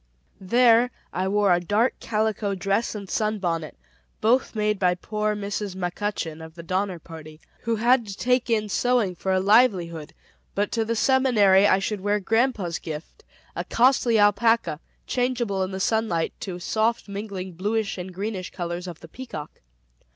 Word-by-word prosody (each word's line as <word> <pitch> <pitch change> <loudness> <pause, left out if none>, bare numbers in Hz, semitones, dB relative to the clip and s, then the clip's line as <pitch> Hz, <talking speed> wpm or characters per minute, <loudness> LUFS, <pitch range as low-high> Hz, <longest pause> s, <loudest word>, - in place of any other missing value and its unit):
There, 235 +4 +4 0.2
I 185 +2 -1
wore 200 -1 +3
a 175 - +3
dark 210 +8 0
calico 215 -2 -1
dress 195 +5 -1
and 200 -2 -6
sun 215 +2 -1
bonnet, 165 -5 -3 0.4
both 240 +3 +2
made 210 -1 0
by 180 -2 +3
poor 210 +3 -2
Mrs. 200 -1 -4
McCutchen 180 -3 -3
of 160 0 -11
the 170 - -9
Donner 185 +1 -1
Party, 155 -2 -11 0.3
who 230 0 +1
had 235 +1 +3
to 195 0 -7
take 250 0 +1
in 215 -2 +1
sewing 235 -2 +1
for 190 +2 -3
a 190 - +3
livelihood; 185 -7 +2 0.4
but 205 +1 0
to 230 - 0
the 230 +1 -2
Seminary, 220 -6 +4
I 190 - +4
should 195 +1 -3
wear 205 +1 +1
grandpa's 220 -4 0
gift, 155 0 -8 0.3
a - - -2
costly 245 -2 +3
alpaca, 205 -4 +3 0.3
changeable 245 -6 -1
in 185 - -1
the 190 0 -5
sunlight 220 -5 0
to 185 -2 -5
soft 220 +6 0
mingling 200 -2 -6
bluish 205 +3 -2
and 180 +1 -6
greenish 195 0 -4
colors 175 0 -5
of 170 -2 -8
the - - -11
peacock. 160 - -9
205 Hz, 165 wpm, -24 LUFS, 185-225 Hz, 0.4 s, There